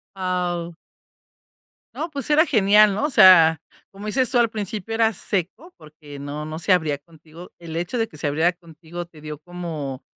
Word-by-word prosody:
Guau. 180 -2 -3 1.2
No, 330 - -4
pues 280 -4 -6
era 305 +2 +5
genial, 210 - +4
¿no? 210 - -2
O - - 0
sea, 180 - +7 0.3
como 200 +1 -11
dices 255 +4 0
tú, 255 - +2
al 235 -1 +3
principio 215 0 -5
era 225 0 +3
seco 205 - -4
porque 150 -2 -13
no 145 +2 -6
no 155 +1 -6
se 170 +4 -1
abría 160 -5 +2
contigo. 160 +3 -15
El 165 -2 -9
hecho 175 +8 -3
de 225 -1 0
que - - -18
se 150 - -3
abriera 160 +5 +1
contigo 170 0 -10
te 170 -2 -18
dio 150 -1 -8
como 155 -6 -6
175 Hz, 185 wpm, -22 LUFS, 155-210 Hz, 1.2 s, sea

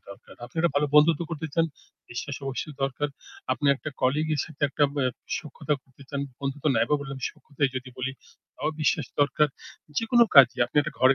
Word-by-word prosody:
দরকার। 100 - -13
আপনারা 160 +6 +1
ভালো 145 +1 +3
বন্ধুত্ব 155 +2 +6
করতে 160 0 -3
চান, 165 -1 +4 0.5
বিশ্বাস 135 +3 -4
অবশ্যই 135 +3 -4
দরকার। 140 +2 0 0.4
আপনি 130 +3 -1
একটা 155 - -6
কলিগের 150 +3 +2
সাথে 155 -2 -13
একটা 145 +1 +2
ব্যা 135 -3 +1 0.3
সখ্যতা 150 -1 -2
করতে 130 +1 -18
চান। 140 -1 -2 0.2
বন্ধুত্ব 140 +1 -3
নাই 110 - +4
বা 150 - +5
বললাম 135 -1 -6
সখ্যতাই 140 -2 -2
যদি 130 0 -5
বলি, 130 +1 -2 0.4
তাও 150 - -1
বিশ্বাস 150 - +2
দরকার। 145 +1 +3 0.5
যেকোনো 235 +1 +5
কাজে 130 -4 +9
আপনি 125 - -11
একটা 150 0 -4
ঘরে 130 +2 +6
145 Hz, 180 wpm, -26 LUFS, 135-155 Hz, 0.5 s, কাজে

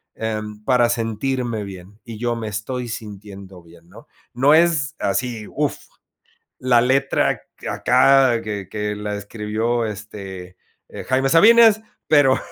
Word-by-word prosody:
em, 105 -1 -5
para 120 -1 +3
sentirme 115 0 -2
bien, 100 +1 -11
y 115 -2 -9
yo 120 +1 -1
me 115 -1 -5
estoy 120 +4 -4
sintiendo 100 -4 -9
bien, 85 0 -19
¿no?, - - -16 0.3
no 135 +5 +4
es 165 -3 +2
así, 115 +2 -2
uf, 150 0 -2 0.8
la 125 -2 +3
letra 135 +3 +1 0.3
acá 135 -4 +3
que 105 -3 -5
que 105 0 -3
la 105 0 -4
escribió, 110 +3 -2
este, 100 -4 -8 0.3
eh, - - -8
Jaime 135 +1 +1
Sabines, 220 +6 +6 0.3
pero 145 -4 +4
115 Hz, 130 wpm, -21 LUFS, 105-130 Hz, 0.8 s, Sabines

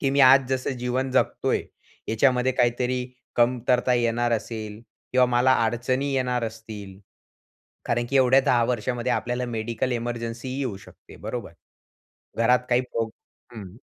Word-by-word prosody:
की 135 - +1
मी 140 +1 +2
आज 130 0 +7
जसं 130 +1 -1
जीवन 125 +2 -1
जगतोय, 130 - +1 0.5
याच्यामध्ये 125 +3 +2
काहीतरी 125 0 0 0.3
कमतरता 125 +1 +2
येणार 120 0 +1
असेल, 110 -2 -4 0.3
किंवा 125 0 +5
मला 125 +1 +3
अडचणी 130 +4 -1
येणार 125 -2 0
असतील, 110 -4 -8 0.9
कारण 120 0 0
की 140 - -2
एवढ्या 130 0 +5
10 120 -2 +3
वर्षामध्ये 125 +1 -1
आपल्याला 125 +1 -1
मेडिकल 115 +1 -2
इमर्जन्सीही 120 +2 -4
येऊ 125 -8 -3
शकते, 95 - -16
बरोबर? - - -6 0.9
घरात 125 +2 +4
काही 125 0 +3
प्रो 115 -3 -3 0.4
हं. 100 -4 -9
120 Hz, 135 wpm, -25 LUFS, 115-130 Hz, 0.9 s, आज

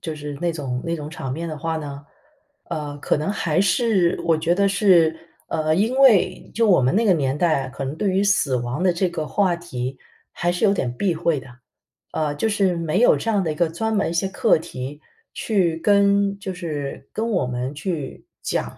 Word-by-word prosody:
就 160 - -5
是 150 -1 -6
那 175 0 +1
种 130 -5 -4
那 170 0 -1
种 150 -2 -6
场 135 -5 -6
面 165 +4 -4
的 155 - -5
话 165 +2 -2
呢， 145 -2 -6 0.7
呃， 145 -2 -4
可 - - 0
能 155 +6 -1
还 175 -4 0
是 195 -2 +2
我 165 -2 +2
觉 165 +2 +1
得 200 +2 +2
是 180 -5 +4 0.3
呃， 155 0 0
因 220 +7 +1
为 215 -9 +4
就 230 -1 +2
我 185 - +5
们 130 +4 +2
那 225 +4 +3
个 200 - +5
年 140 -4 0
代， 150 -5 +1
可 135 +1 -6
能 135 +2 -4
对 200 +3 0
于 190 +2 +1
死 155 -10 +2
亡 120 +6 -3
的 185 -1 +3
这 175 +1 0
个 155 -2 -4
话 180 +6 +1
题 130 -7 -5 0.3
还 175 - -1
是 175 +4 -1
有 200 - +5
点 130 -11 -1
避 190 +1 +1
讳 165 -2 0
的， 135 - -11 0.7
呃， 150 -2 -1
就 220 +9 0
是 195 -4 +1
没 165 +2 -1
有 245 - +6
这 230 - -2
样 205 -2 +2
的 165 - -1
一 - - -4
个 170 +1 +1
专 220 +7 -2
门 200 - +1
一 - - -3
些 170 +3 0
课 190 - +2
题 145 -3 -7 0.3
去 185 -7 0
跟 200 +1 +3
就 195 -1 -5
是 150 -6 -5
跟 225 +1 -2
我 180 -10 +1
们 125 +2 -3
去 155 -2 -5 0.2
讲 - - -3
170 Hz, 235 characters per minute, -22 LUFS, 150-195 Hz, 0.7 s, 有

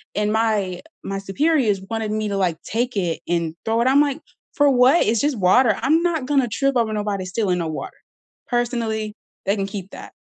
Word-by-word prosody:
and 210 0 0
my 210 -5 0 0.2
my 195 0 -3
superiors 215 +2 +1
wanted 225 -1 -2
me 215 0 -1
to, 200 - -2
like, 180 -4 0
take 240 +2 -2
it 175 -4 -1
and 170 -2 -1
throw 225 +1 +1
it, 240 - +2
I'm 275 +2 +5
like, 290 0 0 0.3
"For 290 0 +4
what, 260 +5 +5
it's 220 0 +1
just 290 -3 0
water, 215 +4 +4
I'm 315 +5 +3
not 325 -6 0
gonna 270 -2 +2
trip 275 +5 0
over 230 -3 +1
nobody 205 -2 -2
stealing 185 -1 -1
no 165 - -2
water." 155 -3 -6 0.5
Personally, 230 -3 -1 0.3
they 200 +1 +2
can 195 -2 -2
keep 195 -1 -7
that. - - -10
220 Hz, 200 wpm, -22 LUFS, 195-255 Hz, 0.5 s, I'm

